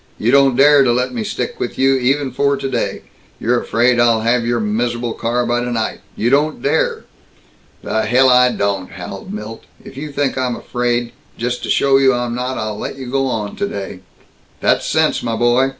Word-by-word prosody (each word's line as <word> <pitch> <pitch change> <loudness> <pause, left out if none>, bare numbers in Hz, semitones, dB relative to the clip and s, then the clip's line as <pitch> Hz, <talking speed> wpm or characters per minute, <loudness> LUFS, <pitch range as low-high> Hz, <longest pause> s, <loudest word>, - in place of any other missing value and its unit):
You 115 - +1
don't 135 -2 +4
dare 140 +1 +6
to 125 - +3
let 125 +1 0
me 115 -3 -3
stick - - -4
with - - -4
you, 135 +1 +3
even 135 +2 0
for 140 0 +1
today! 135 0 -3 0.4
You're 120 +1 +1
afraid 120 +1 +2
I'd 115 -2 +3
have 115 0 +2
your 120 0 +1
mis'able 120 +2 -1
car 120 +1 -1
by 120 0 0
tonight! 120 -2 -2
You 120 +3 0
don't 150 +3 +1
dare!" 485 -2 0 0.8
"The 110 -1 -1
hell 130 +3 +4
I 125 0 +5
don't!" 100 -4 -2
howled 95 +2 -8
Milt. 105 +2 -7 0.2
"If - - -12
you 150 +1 -6
think 140 -2 -1
I'm 125 -2 -1
afraid 120 -1 -2 0.3
Just 125 +1 -2
to - - -5
show 135 -1 +3
you 130 -2 +4
I'm 120 -1 -2
not, 125 +2 -3
I'll 110 -1 -4
let - - -5
you 130 -2 -7
go 135 0 +1
on 110 -5 -3
today!" 100 - -4 0.6
"That's - - +1
sense, - - +1
my 115 -1 -2
boy. 120 +3 +2
125 Hz, 195 wpm, -18 LUFS, 115-135 Hz, 0.8 s, dare